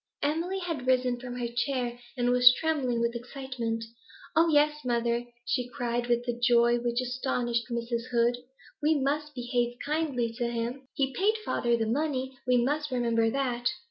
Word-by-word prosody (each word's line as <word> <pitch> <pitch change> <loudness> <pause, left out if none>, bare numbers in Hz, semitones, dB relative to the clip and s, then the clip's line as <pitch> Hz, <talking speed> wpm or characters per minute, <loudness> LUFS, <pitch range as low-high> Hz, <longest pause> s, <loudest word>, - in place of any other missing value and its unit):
Emily 330 +6 0
had 330 -9 -4
risen 250 -1 +2
from 245 0 -7
her 240 -1 -2
chair, 240 0 -2 0.2
and 245 0 +2
was 245 0 +8
trembling 275 -7 0
with 235 0 +1
excitement. 240 -2 -4 0.5
'Oh 330 +1 +5
yes, 300 0 +3
mother,' 235 -1 0 0.2
she 245 0 -1
cried, 240 -1 -2
with 240 0 +1
a 240 - +1
joy 240 0 +4
which 240 0 -1
astonished 245 -2 -1
Mrs. 235 0 -3
Heed, 240 0 +2 0.4
'we 310 +2 +3
must 295 +2 -1
behave 245 -1 -1
kindly 285 -6 -1
to 240 - +1
him. 240 +3 -4
He 270 -1 0
paid 425 +3 +2
father 235 -1 +1
the 225 - 0
money; 265 +1 -1
we 250 0 +4
must 295 +5 0
remember 235 -3 +1
that.' 245 -1 -1
245 Hz, 165 wpm, -28 LUFS, 240-275 Hz, 0.5 s, was